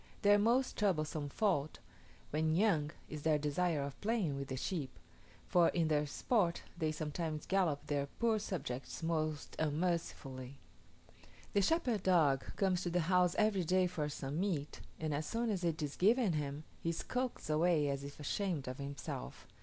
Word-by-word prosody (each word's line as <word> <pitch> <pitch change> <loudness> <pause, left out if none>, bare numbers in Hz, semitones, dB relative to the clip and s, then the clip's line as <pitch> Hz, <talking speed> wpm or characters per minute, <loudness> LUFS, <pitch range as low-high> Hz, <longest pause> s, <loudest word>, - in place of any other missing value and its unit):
Their 205 0 +6
most 240 +5 +2
troublesome 155 -7 0
fault, 155 -5 0 0.5
when 155 +1 +1
young, 170 -7 +3 0.2
is 150 -1 -6
their 155 0 +3
desire 150 +1 0
of 140 -1 -7
playing 205 -9 0
with 140 0 -4
the 130 - -4
sheep; 140 -3 -3 0.5
for 175 -2 +4
in 165 -3 +1
their 150 -1 +2
sport 175 - +1
they 160 -3 0
sometimes 155 0 -3
gallop 175 -7 +1
their 145 -1 -1
poor 225 +7 +1
subjects 145 - -4
most 155 -2 -1
unmercifully. 150 -5 -2 1.0
The 200 - +4
shepherd 245 - +2
dog 160 -8 +3
comes 190 -2 +1
to 180 - -1
the 175 +1 +1
house 180 +1 +3
every 210 -3 +3
day 185 +3 +3
for 155 -4 -2
some 140 +1 -4
meat, 170 -7 -2 0.2
and 155 -1 -1
as 150 +2 -2
soon 230 0 0
as 185 -3 -2
it 165 -2 0
is 145 -1 -3
given 215 0 +4
him, 145 0 -3 0.2
he 165 - -1
skulks 250 +9 -3
away 155 -1 +3
as 140 0 -2
if 140 +1 -8
ashamed 160 -1 -2
of 130 +1 -5
himself. 140 - -6
160 Hz, 165 wpm, -35 LUFS, 145-190 Hz, 1.0 s, Their